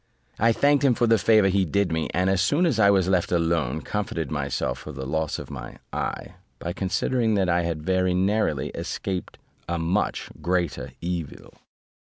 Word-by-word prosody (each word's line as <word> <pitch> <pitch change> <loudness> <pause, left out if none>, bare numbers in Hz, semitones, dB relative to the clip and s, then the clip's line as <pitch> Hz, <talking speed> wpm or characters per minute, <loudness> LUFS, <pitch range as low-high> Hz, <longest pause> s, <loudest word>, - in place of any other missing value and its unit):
I 115 +2 +4
thanked 145 +4 +3
him 130 -4 +4
for 120 - +2
the 115 -1 +4
favour 105 -1 +5
he 95 0 +2
did 100 +2 0
me; 80 -1 -1
and 90 +1 +1
as 95 -1 +2
soon 145 - +2
as 135 -10 +1
I 100 -2 +6
was 95 -3 +3
left 90 -2 +1
alone, 85 -2 +1
comforted 85 -8 -3
myself 70 -3 -2
for 75 - -8
the 65 -2 -6
loss 80 +2 -1
of - - -8
my - - -8 0.2
eye, - - -3 0.2
by 85 - -4
considering 110 +5 0
that 95 -3 +1
I 85 0 +3
had 85 -2 -3
very 95 0 +2
narrowly 95 -6 +1
escaped 95 -2 -4 0.3
a 85 - 0
much 85 +3 -1
greater 90 +1 -1
evil. 85 -3 -5
90 Hz, 185 wpm, -25 LUFS, 85-100 Hz, 0.3 s, I